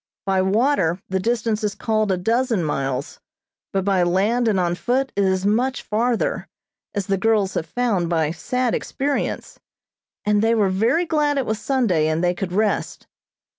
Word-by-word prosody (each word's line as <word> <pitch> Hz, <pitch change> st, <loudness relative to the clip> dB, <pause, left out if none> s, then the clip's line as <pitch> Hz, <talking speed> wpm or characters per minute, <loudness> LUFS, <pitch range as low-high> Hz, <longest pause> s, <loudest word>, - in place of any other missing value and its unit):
By 190 Hz, -1 st, +2 dB
water 190 Hz, -, +2 dB
the 190 Hz, 0 st, 0 dB
distance 225 Hz, +1 st, -1 dB
is 205 Hz, -1 st, -1 dB
called 215 Hz, -1 st, 0 dB
a 185 Hz, -, +1 dB
dozen 230 Hz, +1 st, +1 dB
miles, 135 Hz, -3 st, -3 dB, 0.5 s
but 195 Hz, -1 st, -1 dB
by 195 Hz, -2 st, +2 dB
land 200 Hz, +7 st, +2 dB
and 205 Hz, -4 st, +2 dB
on 175 Hz, -1 st, +1 dB
foot 255 Hz, +8 st, -1 dB
it 200 Hz, -, +2 dB
is 190 Hz, 0 st, +1 dB
much 245 Hz, +5 st, +1 dB
farther, 230 Hz, +2 st, -1 dB, 0.5 s
as 200 Hz, -2 st, -1 dB
the 195 Hz, 0 st, 0 dB
girls 210 Hz, -3 st, +2 dB
have 160 Hz, -, -3 dB
found 205 Hz, -5 st, 0 dB
by 160 Hz, -3 st, +1 dB
sad 250 Hz, +8 st, -1 dB
experience; 280 Hz, +1 st, -3 dB, 0.7 s
and 210 Hz, 0 st, +3 dB
they 225 Hz, +1 st, +3 dB
were 205 Hz, -3 st, +2 dB
very 230 Hz, -, +1 dB
glad 300 Hz, -3 st, +1 dB
it 270 Hz, -, 0 dB
was 220 Hz, -1 st, -2 dB
Sunday, 220 Hz, -, +1 dB
and 160 Hz, +2 st, 0 dB
they 175 Hz, 0 st, +2 dB
could 180 Hz, 0 st, -4 dB
rest. 210 Hz, +2 st, -1 dB
205 Hz, 170 wpm, -22 LUFS, 185-240 Hz, 0.7 s, and